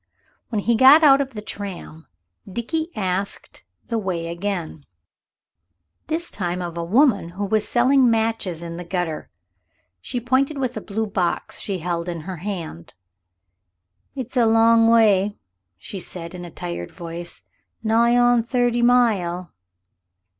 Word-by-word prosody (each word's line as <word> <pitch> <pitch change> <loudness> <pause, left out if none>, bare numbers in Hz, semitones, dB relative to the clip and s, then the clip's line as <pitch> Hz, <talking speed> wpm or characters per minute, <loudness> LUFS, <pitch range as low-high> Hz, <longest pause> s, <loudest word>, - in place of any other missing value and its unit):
When 215 -4 -1
he 235 - +2
got 270 +7 +7
out 280 -2 +7
of 265 -3 -5
the 210 - -6
tram 185 -6 -7 0.4
Dickie 315 - -3
asked 195 -1 -4 0.2
the 230 -2 -2
way 175 -5 -3
again, 170 -4 -4 1.2
this 330 +2 -2
time 180 -2 -3
of 175 -2 -5
a 170 - -3
woman 200 - +3
who 205 - -1
was 215 +1 0
selling 255 +1 +4
matches 220 -7 -1
in 170 0 -6
the 175 - -6
gutter. 175 -3 -3 0.7
She 245 - -4
pointed 260 +5 +1
with 255 -3 -2
the 215 - -5
blue 220 +2 -3
box 195 -4 -2
she 195 -2 -1
held 170 0 -3
in 170 -2 -4
her 180 +3 -6
hand. 165 - -6 1.2
"It's 260 -1 -6
a 240 -2 +4
long 225 0 +5
way," 210 -3 +4 0.4
she 190 - -7
said, 170 -1 -5
in 175 -1 -7
a - - -8
tired 85 - -6
voice; 170 0 -8 0.4
"nigh 230 +2 +3
on 245 -1 +4
thirty 240 0 0
mile." 205 -8 +2
205 Hz, 145 wpm, -22 LUFS, 175-240 Hz, 1.2 s, got